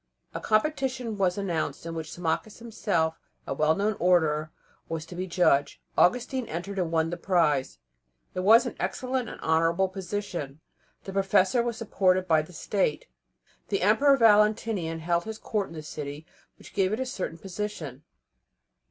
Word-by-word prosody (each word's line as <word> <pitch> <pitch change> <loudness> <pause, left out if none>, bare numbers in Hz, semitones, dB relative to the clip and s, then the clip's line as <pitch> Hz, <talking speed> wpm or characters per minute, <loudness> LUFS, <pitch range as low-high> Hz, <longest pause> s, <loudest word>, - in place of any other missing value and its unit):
A - - -3
competition 255 0 0
was 190 -2 +1
announced 170 -8 -2
in 165 - -4
which 160 -1 -5
Symmachus, 175 +5 -2
himself 200 -8 -1 0.3
a - - -2
well 155 +3 +2
known 210 +2 0
orator, 160 -4 +2 0.4
was 160 -1 -3
to 170 - -11
be 185 +1 -3
the 170 - -9
judge. 145 -6 +3 0.2
Augustine 250 +5 +2
entered 190 +5 -4
and 170 -3 -1
won 165 0 +1
the 175 - -3
prize. 165 -7 +1 0.6
It - - -3
was 220 +6 +6
an - - -4
excellent 255 -1 -2
and - - -9
honourable 165 +4 +2
position. 185 -6 -5 0.4
The 195 - -7
professor 195 +4 +3
was 235 -1 -2
supported 185 -4 +1
by 160 -2 +4
the 155 - -11
State. 180 -2 -1 0.6
The 195 -2 -1
Emperor 275 +8 +5
Valentinian 210 -6 +3
held 170 +1 0
his 220 0 -5
Court 210 -3 -2
in - - -12
the 155 - -7
city, 150 0 -7 0.3
which - - -15
gave 190 -1 +2
it 220 - -1
a 260 - -1
certain 185 -9 -4
position. 175 -8 -5
185 Hz, 165 wpm, -27 LUFS, 160-215 Hz, 0.6 s, was